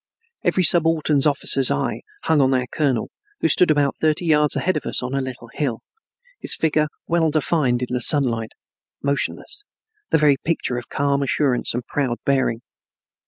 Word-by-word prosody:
Every 185 - +1
subaltern 160 -3 +3
officer's 135 -2 +2
eye - - -2 0.2
hung 155 -3 +2
on 130 0 +2
our 125 -1 0
colonel, 130 -3 -1 0.3
who - - +1
stood 180 - +5
about 145 -2 +2
thirty 155 +2 0
yards 150 -2 +3
ahead 185 - 0
of 155 - -4
us - - +1
on 125 +1 -4
a 135 - 0
little 125 -3 -7
hill, 130 -7 -3 0.6
his - - +1
figure 155 -1 +1 0.2
well 165 -1 +1
defined 145 -5 0
in 125 - -5
the 125 - -1
sunlight, 120 -6 +2 0.5
motionless, 140 - -3 0.5
the - - +3
very 150 -3 +3
picture 145 -7 -1
of 120 - -13
calm 140 0 0
assurance 135 -3 0
and 120 0 -4
proud 130 -4 -2
bearing. 130 -4 0
140 Hz, 165 wpm, -21 LUFS, 125-155 Hz, 0.6 s, stood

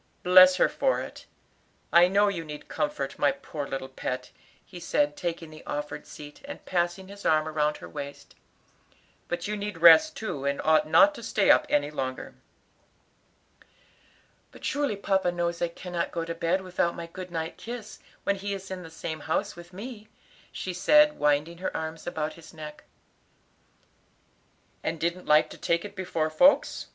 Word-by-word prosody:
Bless 185 0 +8
her - - +4
for - - 0
it! - - -9 0.7
I 175 +1 +8
know 200 +2 +3
you 185 -5 -2
need 150 -1 -9
comfort, 145 -1 -3
my 145 - +4
poor 140 +1 -6
little 135 -1 -4
pet," 130 -1 -5 0.3
he 180 - -11
said, 295 - +1
taking 170 - -4
the 155 - -12
offered 150 0 -5
seat, 145 0 -11
and 285 - -9
passing 175 +1 -1
his 200 +1 -11
arm 155 0 +2
round 150 -1 0
her - - -10
waist. 140 -1 -8 0.9
"But 175 - -3
you 210 - -2
need 205 -2 -5
rest 170 - +7
too, 150 -11 -4
and 140 0 -1
ought 155 -1 +4
not 295 - +6
to 285 - -10
stay 215 -3 +3
up - - +4
any 145 0 +1
longer." 130 -3 -4 2.2
"But - - -11
surely 285 -6 0
papa 190 -2 +1
knows 170 -1 -2
I 175 - +2
cannot 170 0 -4
go 165 -1 -3
to 165 - -4
bed 170 +3 0
without 180 -2 -1
my 170 - -6
good 185 +2 -9
night 165 -1 -4
kiss 235 -2 -8 0.2
when 200 - +1
he 200 +1 -3
is 195 0 -9
in 185 -1 -5
the 165 - -10
same 160 -1 -6
house 160 +2 -2
with 175 0 -12
me," 215 +2 -9 0.4
she 185 - -5
said, 300 +11 +5
winding 150 +3 +1
her 185 - -3
arms 160 +1 -6
about 155 -3 -2
his 160 -1 -15
neck. 150 -1 -9 2.0
"And 165 0 -2
didn't 170 +3 -2
like 150 0 +4
to - - -11
take 170 +3 0
it 205 0 -9
before 170 -5 -2
folks? 270 - +3
170 Hz, 175 wpm, -27 LUFS, 155-190 Hz, 2.2 s, Bless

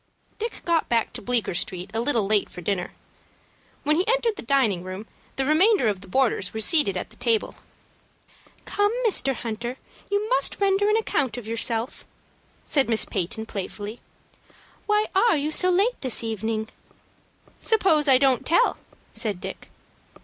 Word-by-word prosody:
Dick 455 +2 -5
got 335 -2 +1
back 230 -2 +1
to - - -6
Bleecker 240 -2 -1
Street 180 +2 -3
a 225 - 0
little 235 -4 +1
late 205 0 +1
for 180 - -9
dinner. 180 0 -2 0.9
When 300 +1 +2
he 365 +5 0
entered 470 -2 +1
the - - -7
dining 235 -8 +1
room, 185 +3 -7 0.3
the 270 - -1
remainder 350 - +4
of 200 -3 -1
the 195 - -13
boarders 220 -3 0
were - - -2
seated 220 - +4
at - - -5
the - - -14
table. 230 -3 0 1.1
"Come, 410 0 +1
Mr. 275 - +2
Hunter, 235 +2 -5 0.3
you 405 +1 0
must - - +1
render 400 +1 +2
an 425 - +3
account 285 - -1
of 245 - -7
yourself," 230 +2 -2 0.6
said 275 -5 +1
Miss 225 -1 +2
Peyton, 205 +5 -3
playfully. 205 +2 -6 0.9
"Why 420 0 +3
are 410 -1 +4
you 295 +2 -2 0.2
late 400 +7 +1
this 255 -3 0
evening?" 220 0 -3 0.9
"Suppose 355 -9 +2
I 265 -2 +7
don't 260 -2 +3
tell," 480 +9 +2 0.3
said 210 -6 -1
Dick. - - -8
250 Hz, 155 wpm, -24 LUFS, 215-365 Hz, 1.1 s, I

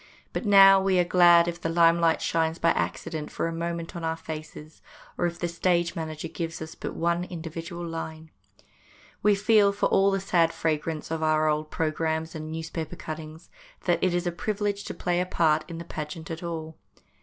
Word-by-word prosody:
But 230 - -3
now 195 -1 +8
we 190 -1 +2
are 180 - +5
glad 175 -1 +6
if 175 0 -4
the 165 - -1
limelight 165 0 +3
shines 160 0 0
by 170 - +3
accident 160 -2 -3
for - - -2
a 165 - -3
moment 170 0 -4
on 170 - -5
our 160 0 -1
faces, 155 -1 -9 0.3
or - - +1
if 170 0 -5
the 175 - -2
stage 170 0 0
manager 160 -1 -5
gives 165 0 -5
us 160 0 -7
but - - -6
one 170 +1 0
individual 170 0 -6
line. 160 -1 -6 0.9
We 205 0 +4
feel, 205 0 +4
for 200 - -1
all 195 +1 +4
the 195 0 0
sad 175 -4 +2
fragrance 155 0 -2
of 165 -1 -2
our 155 0 +2
old 155 0 0
programmes 160 0 -1
and 155 -1 -6
newspaper 160 0 -5
cuttings, 155 +1 -8 0.3
that 175 -2 +1
it 185 -1 +2
is 175 +1 -1
a 175 - 0
privilege 205 +2 -2
to - - -6
play 175 0 0
a - - 0
part 160 -4 +2
in 165 - -6
the 170 - -7
pageant 160 +1 -6
at 165 - -5
all. 160 -2 -5
165 Hz, 195 wpm, -26 LUFS, 160-175 Hz, 0.9 s, now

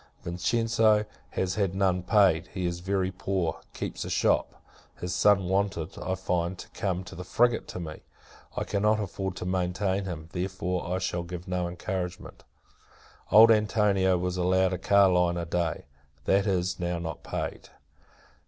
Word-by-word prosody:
Vincenzo 110 +4 +2 0.2
has 95 -1 -1
had 95 -3 0
none 95 -2 +2
paid. 95 -3 +3
He 95 -2 -4
is 85 0 -2
very 95 0 -1
poor; 95 -3 -2
keeps - - -4
a - - -6
shop. - - +1 0.4
His 90 -1 -3
son 100 0 +4
wanted, 95 -4 -1
I 95 - -1
find, 90 -1 -1
to - - -9
come 95 -2 -2
in 85 - -9
the 90 - -5
frigate 120 +5 +2
to - - -6
me. 80 -3 -7 0.6
I - - 0
cannot 105 +1 +1
afford 95 -2 -3
to 90 - -5
maintain 95 +2 0
him; 80 -4 -6
therefore, 90 -1 -2
I 90 - +1
shall 90 -1 -2
give 90 0 -7
no 90 -1 -1
encouragement. 90 0 -5 0.9
Old 110 +2 +9
Antonio 100 -3 +3
was 90 +1 -2
allowed 95 +1 +2
a 90 - -3
carline 90 -3 +4
a 85 - -2
day; 85 -1 -2 0.4
that 100 +1 +3
is, 90 -2 0
now, 85 0 -1
not 80 -2 -5
paid. - - -5
95 Hz, 160 wpm, -28 LUFS, 90-100 Hz, 0.9 s, Old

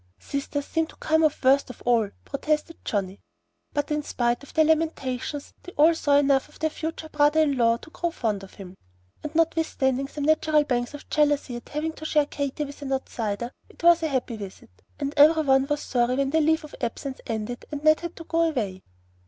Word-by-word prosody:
"Sisters 280 0 -4
seem 325 -1 0
to - - -16
come 315 +1 +1
off 305 -3 +1
worst 270 +1 +4
of 250 - -11
all," 230 -4 +3 0.2
protested 305 +3 -1
Johnnie. 195 -2 -2 0.5
But 290 0 -2
in 300 0 +1
spite 240 -4 -1
of 280 - -13
their 315 - +4
lamentations 295 -3 -1
they 360 - -11
all 315 +3 +5
saw 290 -3 +3
enough 275 -2 +3
of - - -18
their 315 -1 -1
future 320 0 -5
brother 300 0 +3
in 290 -3 +2
law 230 -2 +3
to 315 - -15
grow 345 - -2
fond 220 -10 -2
of 195 - -13
him; 185 -2 -10 0.5
and 300 +1 -7
notwithstanding 310 -5 +1
some 290 0 -6
natural 310 0 +3
pangs 245 0 -1
of 290 - -11
jealousy 290 -4 +2
at 240 - -9
having 310 +2 -2
to 315 - -10
share 300 -1 +3
Katy 285 +1 -3
with 285 +1 -11
an 275 -1 -5
outsider, 235 -3 -3 0.2
it - - -17
was 340 0 +6
a 320 - +1
happy 255 -5 -2
visit, 195 - -10 0.3
and 285 -1 -2
every 310 +2 +7
one 270 -1 +3
was 295 0 -1
sorry 245 0 +1
when 275 0 0
the 320 +1 +3
leave 320 +1 +2
of 305 - -11
absence 265 +3 -4
ended, 225 +1 -4
and 295 -1 -5
Ned 310 0 +5
had 340 0 -6
to 330 - -9
go 330 0 0
away. 205 -10 -3
285 Hz, 210 wpm, -25 LUFS, 250-315 Hz, 0.5 s, every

